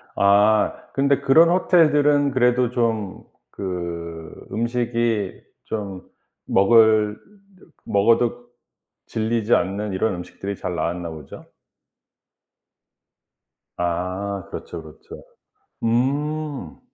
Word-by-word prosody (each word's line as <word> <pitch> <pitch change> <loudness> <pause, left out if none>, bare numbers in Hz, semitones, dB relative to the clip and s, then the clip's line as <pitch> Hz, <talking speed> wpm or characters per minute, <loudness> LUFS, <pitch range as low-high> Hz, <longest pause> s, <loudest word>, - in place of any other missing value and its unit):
아 105 +2 +4 0.2
근데 140 0 +2
그런 165 +5 +5
호텔들은 150 -5 +3
그래도 125 -1 +2
좀 110 -5 -2 0.3
그 85 -3 -5 0.2
음식이 115 -3 -1 0.2
좀 100 -4 -5 0.4
먹을 110 +1 +4 0.7
먹어도 115 +4 +1 0.6
질리지 115 0 0
않는 100 +2 -2
이런 95 +2 0
음식들이 95 +3 -7
잘 90 -1 -4
나왔나 85 0 -3
보죠? 75 -3 -10 2.3
아 90 +3 -2
그렇죠 85 - -7
그렇죠. 80 -1 -13 0.6
음. 140 - -1
110 Hz, 170 characters per minute, -22 LUFS, 95-125 Hz, 2.3 s, 그런